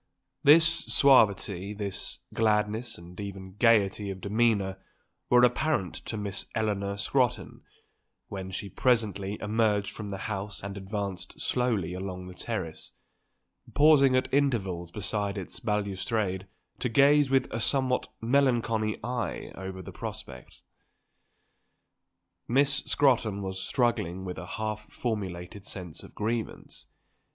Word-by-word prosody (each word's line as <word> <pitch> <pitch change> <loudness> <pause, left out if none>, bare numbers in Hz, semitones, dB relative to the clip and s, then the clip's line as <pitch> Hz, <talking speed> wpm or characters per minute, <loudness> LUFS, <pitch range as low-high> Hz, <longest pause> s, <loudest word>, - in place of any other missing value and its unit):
This 155 +3 +8 0.2
suavity, 105 -7 +4
this 100 -2 -5
gladness 110 +1 +1
and 85 +2 -12
even 95 -2 -7
gaiety 105 -3 +3
of 95 -1 -5
demeanour 100 -2 +1 0.5
were 125 0 +6
apparent 125 - +2
to 110 - -3
Miss 105 -1 -3
Eleanor 100 -2 -1
Scrotton 125 +4 0 0.7
when 95 -1 -6
she 95 +2 -5
presently 105 -3 +1
emerged 105 -1 +1
from 105 -2 -6
the 100 - -4
house 105 -2 -4
and 100 0 -5
advanced 100 -1 -5
slowly 110 -9 0
along 90 0 -5
the 90 - -9
terrace, 90 -5 -5 0.8
pausing 145 -3 +6
at 130 - +2
intervals 100 -12 +1
beside 105 +1 -2
its 95 - -6
balustrade 100 -2 -1 0.3
to 125 - -1
gaze 140 +3 +5
with 135 -1 +3
a 115 - -1
somewhat 130 +1 +2
melancholy 115 -4 +1
eye 120 -1 -3
over 95 0 -7
the - - -8
prospect. - - -7 1.8
Miss 140 +3 +3
Scrotton 120 -7 +2
was 95 0 -4
struggling 95 -7 0
with 90 -3 -5
a 90 - -8
half 110 -1 -2
formulated 100 -4 -5
sense 90 -5 -5
of - - -14
grievance. 110 +1 -4
105 Hz, 120 wpm, -28 LUFS, 95-120 Hz, 1.8 s, This